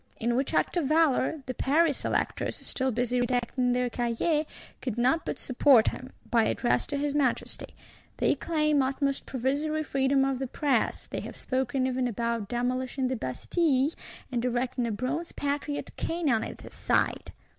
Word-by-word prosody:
In 235 +1 +1
which 265 +2 0
act - - +1
of 320 -6 +1
valour, 310 -1 +2
the 255 - -3
Paris 295 +3 +2
Electors, - - -1
still 260 0 -2
busy 245 +1 0
redacting 245 0 +1
their 250 0 +1
Cahier, 245 +7 0 0.3
could 245 -4 -3
not 255 +7 +2
but - - -2
support 255 -2 +4
him, 255 +1 -8 0.2
by 230 -2 +4
Address 240 - +1
to 285 - -2
his 290 0 -1
Majesty: 275 -5 -1 0.4
they - - +3
claim 305 -3 +1
utmost 275 +1 -1
"provisory 285 +5 -1
freedom 270 0 +2
of 270 -2 -1
the 265 - -2
press;" 265 -2 0
they - - -5
have - - -8
spoken 255 0 -1
even 255 -1 0
about 235 -2 -2
demolishing 255 +2 -1
the 260 - 0
Bastille, 265 - +1 0.4
and 240 -2 -1
erecting 250 0 0
a - - -1
Bronze 255 +10 -3
Patriot 285 +1 -3
King 330 -4 0
on 225 -2 +2
the - - -7
site! - - 0
260 Hz, 165 wpm, -28 LUFS, 245-285 Hz, 0.4 s, support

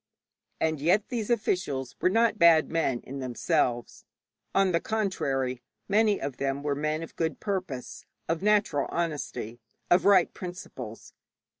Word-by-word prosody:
And 160 -3 0
yet 185 +7 +2
these 235 -4 -3
officials 180 - -1
were - - +4
not 225 +1 +2
bad 165 -2 +6
men 145 -7 0
in 135 +1 -7
themselves; 125 -1 -1 0.5
on 195 -1 +4
the 170 - +2
contrary, 135 - -1 0.3
many 210 0 +3
of 135 -2 -4
them 140 +1 -2
were 145 -1 0
men 155 +2 -1
of 165 - -10
good 160 -1 -2
purpose, 185 - -4 0.2
of 165 0 -1
natural 205 -8 +2
honesty, 135 -8 -3 0.3
of 175 +1 +5
right 195 -3 +5
principles. 180 0 -8
165 Hz, 140 wpm, -28 LUFS, 135-195 Hz, 0.5 s, bad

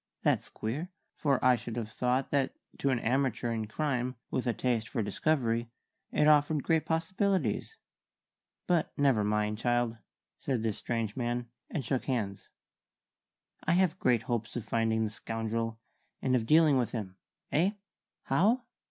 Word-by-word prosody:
That's - - +2
queer, 140 +11 -4 0.2
for 140 -3 +2
I 130 -1 +7
should 120 -1 -6
have 110 -2 -4
thought 125 +2 0
that 140 -2 +1 0.2
to 140 - +1
an 130 - +2
amateur 120 0 0
in 110 -2 -2
crime 130 0 -1 0.2
with 130 - -1
a - - +4
taste 115 -3 0
for 115 -5 -1
discovery 115 +1 0 0.4
it 150 - +3
offered 150 -1 +4
great 160 -1 +1
possibilities. 190 - 0 0.9
But 175 -3 +1
never 135 -7 +3
mind, 105 0 0
child," 120 -1 +1 0.4
said 125 -5 -1
this 110 -3 -1
strange 115 -3 -2
man, 120 -1 -2 0.2
and 140 -6 -3
shook 130 +1 -1
hands. 105 -7 -2 1.1
"I - - +2
have 185 -2 +2
great 120 -3 +3
hopes 115 -2 -2
of 120 - -3
finding 115 -1 +1
the 110 - -1
scoundrel, 115 +1 -3 0.4
and 130 -1 +1
of 115 -3 0
dealing 155 -2 +6
with 120 - -1
him. 100 -5 -5 0.3
Eh? 180 +7 +3 0.5
'How?' 210 - +3
125 Hz, 150 wpm, -31 LUFS, 115-145 Hz, 1.1 s, I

